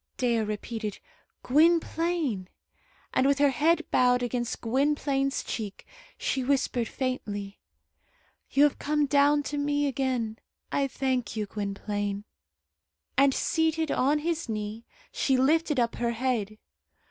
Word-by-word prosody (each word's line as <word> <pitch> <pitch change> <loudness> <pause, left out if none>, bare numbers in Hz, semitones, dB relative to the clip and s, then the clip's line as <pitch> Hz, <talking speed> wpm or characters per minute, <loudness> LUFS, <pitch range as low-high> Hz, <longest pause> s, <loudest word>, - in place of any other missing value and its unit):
Dea 240 -2 +2
repeated 215 0 -3 0.5
"Gwynplaine;" 320 - +2 0.7
and 260 - +3
with 280 0 +3
her 285 -1 +4
head 320 +6 +2
bowed 250 0 +4
against 240 -1 -2
Gwynplaine's 275 +2 0
cheek, 210 -4 -5 0.3
she 265 - -1
whispered 255 -3 +1
faintly, 205 -7 -4 0.9
"You 280 - +4
have 295 - +3
come 295 0 +1
down 290 +1 +4
to 290 0 -3
me 290 0 +1
again. 255 -5 -1 0.3
I 280 -1 +1
thank 255 -4 -2
you, 215 -1 -1
Gwynplaine." 205 0 -3 0.9
And 275 +1 +5
seated 320 +2 0
on 285 +4 +2
his 330 -2 -2
knee, 215 +1 -4 0.3
she 265 -2 +1
lifted 300 +2 +2
up 235 -1 +1
her 235 -1 0
head. 225 -4 -1
260 Hz, 125 wpm, -28 LUFS, 225-290 Hz, 0.9 s, And